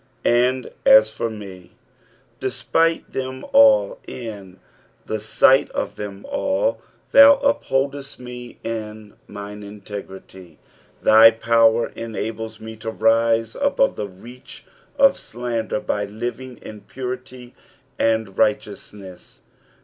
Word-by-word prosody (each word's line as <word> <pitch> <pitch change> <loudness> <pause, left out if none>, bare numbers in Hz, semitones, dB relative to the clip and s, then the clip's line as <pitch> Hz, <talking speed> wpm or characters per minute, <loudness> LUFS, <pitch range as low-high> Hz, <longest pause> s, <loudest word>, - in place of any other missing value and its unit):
"And 125 +1 +1
ai 110 - +8
for 110 +1 -4
me," 100 -4 -11 0.7
despite 165 0 -1
them 130 0 -5
ali 275 - +5
and 105 -6 -8
in - - -29 0.5
the 110 - -3
sight 130 +5 +3
of - - -3
them 100 -1 -8
ail, 285 +14 0
" - - -38
thou 280 0 +8
vpholdeft 140 - -1
me 125 -1 -10
in 110 -2 -6
mine 105 0 -9
inttgrUy 95 -4 -10 0.2
;" - - -33
thy 110 +1 +8
power 115 0 +2
enables 110 -1 -6
me 110 0 -9
to 110 +1 -6
rise 115 0 +1
above 280 -1 +1
the 105 - -4
reach 115 +7 -14 0.3
of 275 0 +5
slander 120 0 -4
by 105 -6 -2
living 120 +4 -6
in 105 -1 -10
purity 125 0 -8 0.5
and 110 -4 0
righteousness. 105 -3 -3
115 Hz, 120 wpm, -21 LUFS, 105-130 Hz, 0.7 s, ai